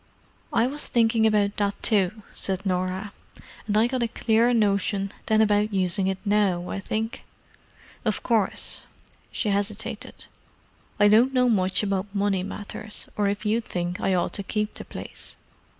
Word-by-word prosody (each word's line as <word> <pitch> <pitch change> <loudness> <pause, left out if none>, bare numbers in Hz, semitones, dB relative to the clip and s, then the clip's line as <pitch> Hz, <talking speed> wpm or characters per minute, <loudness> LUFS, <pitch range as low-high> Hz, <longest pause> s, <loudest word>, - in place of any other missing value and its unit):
"I 230 - +3
was 290 +4 -4
thinking 225 -1 +3
about 205 -2 +2
that, 200 -1 -1
too," 210 0 +1
said 190 0 -3
Norah. 185 +2 -1 0.5
"And 210 0 +1
I 220 - +5
got 255 +1 -1
a 235 - +2
clearer 230 +1 +2
notion 200 -3 +1 0.2
than 220 0 +4
about 210 -1 +2
using 185 +1 +2
it 190 -1 0
now, 200 -4 +2
I - - -3
think. 220 +3 -3 0.8
Of 215 -4 -1
course,"—she 220 0 -2
hesitated—"I 205 0 -3
don't 235 +6 +5
know 250 -1 +4
much 190 -2 +2
about 200 0 -2
money 200 -2 +1
matters, 205 +2 -6
or 205 -1 +1
if 205 +2 -2
you 220 +3 +2
think 175 -4 -3
I 190 - +2
ought 175 - 0
to 200 - -2
keep 210 +2 -2
the - - -7
place. - - -8
205 Hz, 150 wpm, -25 LUFS, 195-220 Hz, 0.8 s, I